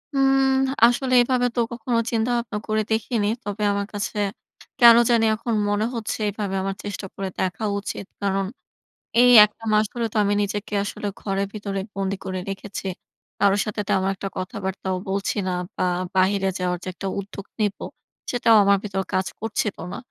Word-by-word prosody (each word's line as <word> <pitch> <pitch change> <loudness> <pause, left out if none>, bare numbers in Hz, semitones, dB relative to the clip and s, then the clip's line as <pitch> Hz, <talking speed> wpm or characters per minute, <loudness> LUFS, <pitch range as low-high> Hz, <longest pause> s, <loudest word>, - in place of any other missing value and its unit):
উম 270 0 +4 0.3
আসলে 255 +2 +2
এভাবে 245 0 +2
তো - - 0
কখনো 235 0 -2
চিন্তা 230 +1 +1
ভাবনা 230 -3 -3
করে 215 0 +1
দেখিনি। 220 -1 0 0.2
তবে 205 +1 -4
আমার 200 0 -2
কাছে 205 +1 -3 0.6
কেন 235 -1 +9
জানি 230 -1 +4
এখন 230 +1 -3 0.2
মনে 205 +1 +1
হচ্ছে 225 -1 -3
এইভাবে 200 -1 -3
আমার 195 0 -2
চেষ্টা 205 -1 -5
করে 195 - -3
দেখা 185 +4 -1
উচিত। 200 - -6 0.2
কারণ 195 -1 0 0.8
এই 250 0 +7
একটা 210 +2 -7
মাস 215 0 +4
হলে 235 -1 -1
তো - - -6
আমি 205 +1 +2
নিজেকে 205 +1 -3
আসলে 205 - -5
ঘরের 195 0 -1
ভেতরে 200 -2 -4
বন্দি 195 0 -2
করে 185 -1 -3
রেখেছি। 195 0 -6 0.5
কারো 200 0 +4
সাথে 210 0 -4
তেমন 190 0 +2
একটা 195 +1 -5
কথাবার্তাও 190 -1 -3
বলছি 195 +2 -1
না 185 - 0 0.2
বা - - 0 0.3
বাহিরে 195 +1 +3
যাওয়ার 180 -1 -1
যে - - -5
একটা 195 - -6
উদ্যোগ 200 0 -7
নিবো, 205 -1 -1 0.5
সেটাও 230 -2 +4
আমার 200 0 +4
ভিতর 195 -2 -2
কাজ 185 0 +1
করছিল 220 -1 -2 0.2
না। - - -4
205 Hz, 170 wpm, -23 LUFS, 195-225 Hz, 0.8 s, কেন